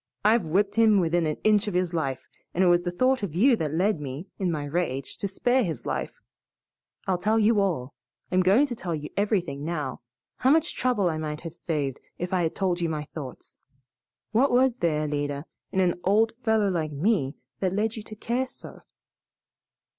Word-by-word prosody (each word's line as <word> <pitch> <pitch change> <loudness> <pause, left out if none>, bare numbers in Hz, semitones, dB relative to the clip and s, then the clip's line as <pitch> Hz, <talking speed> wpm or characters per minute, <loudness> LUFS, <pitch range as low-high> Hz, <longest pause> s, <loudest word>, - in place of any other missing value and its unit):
I've 220 0 +5
whipped 195 +5 +2
him 220 -2 +5
within 170 -1 +1
an 155 - -2
inch 210 0 +3
of 205 - -2
his 180 -1 0
life, 140 -6 -2 0.3
and 185 - +3
it - - +5
was 175 0 +4
the 175 - -2
thought 255 +7 +2
of 185 -6 -4
you 240 +7 +5
that 155 -6 -2
led 180 +3 +1
me, 140 +4 -5
in 190 -2 0
my 150 -3 -2
rage, 145 -3 -2
to 200 - -2
spare 245 +6 +1
his 160 - -4
life. - - -3 0.9
I'll 185 -2 0
tell 215 +4 +2
you 220 0 +4
all 155 -10 -1 0.4
I'm 185 0 +4
going 200 +10 +5
to 250 -4 -5
tell 175 -6 -3
you 150 -1 -6
everything 180 -9 0
now. 150 -5 -3 0.4
How 260 - +2
much 320 +3 +3
trouble 240 -7 +1
I 160 -2 0
might 150 -1 -4
have 165 -1 -7
saved 150 -6 -3 0.2
if 180 +1 -4
I 185 - +2
had 165 -2 -1
told 180 -3 0
you 170 - +1
my 155 -2 -2
thoughts! 145 -3 -9 0.7
What 250 +6 +4
was 250 0 +3
there, 160 -6 +1
Alida, 145 -1 -2 0.3
in 190 - 0
an 180 -2 +2
old 215 +4 +3
fellow 220 -3 +2
like 160 -4 -1
me 150 -2 +1 0.2
that 185 -2 0
led 210 +3 0
you 220 - -5
to 215 +1 -10
care 240 +4 -1
so?" - - -10
180 Hz, 200 wpm, -26 LUFS, 155-215 Hz, 0.9 s, I've